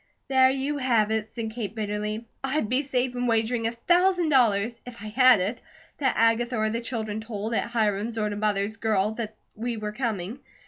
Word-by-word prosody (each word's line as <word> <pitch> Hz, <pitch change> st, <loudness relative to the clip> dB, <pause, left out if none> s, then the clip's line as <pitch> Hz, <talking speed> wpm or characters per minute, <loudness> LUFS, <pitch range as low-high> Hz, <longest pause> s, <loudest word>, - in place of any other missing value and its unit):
"There 260 Hz, -1 st, +5 dB
you 275 Hz, +2 st, -1 dB
have 230 Hz, -5 st, +2 dB
it!" 220 Hz, -1 st, 0 dB
said 225 Hz, -1 st, -5 dB
Kate, 220 Hz, -2 st, -5 dB
bitterly. 210 Hz, +1 st, -3 dB, 0.2 s
"I'd 270 Hz, -3 st, 0 dB
be 255 Hz, +5 st, +1 dB
safe 260 Hz, -2 st, -1 dB
in 245 Hz, 0 st, -1 dB
wagering 225 Hz, 0 st, +1 dB
a -, -, -1 dB
thousand 350 Hz, +7 st, +2 dB
dollars, 230 Hz, -4 st, +2 dB
if 240 Hz, -4 st, -10 dB
I 215 Hz, -, -5 dB
had 255 Hz, 0 st, +6 dB
it, 210 Hz, +7 st, -2 dB, 0.4 s
that 270 Hz, -3 st, +1 dB
Agatha 230 Hz, +2 st, +2 dB
or 215 Hz, 0 st, +1 dB
the 230 Hz, +1 st, -2 dB
children 220 Hz, -3 st, -3 dB
told, 220 Hz, 0 st, -4 dB
at 230 Hz, -, 0 dB
Hiram's 220 Hz, -1 st, 0 dB
or 210 Hz, -1 st, +1 dB
to 205 Hz, -, -3 dB
Mother's 210 Hz, 0 st, 0 dB
girl, 215 Hz, -2 st, +1 dB
that 220 Hz, -1 st, -5 dB, 0.2 s
we 230 Hz, +1 st, -3 dB
were 210 Hz, -1 st, -4 dB
coming. 220 Hz, -1 st, -3 dB
225 Hz, 195 wpm, -26 LUFS, 215-245 Hz, 0.4 s, had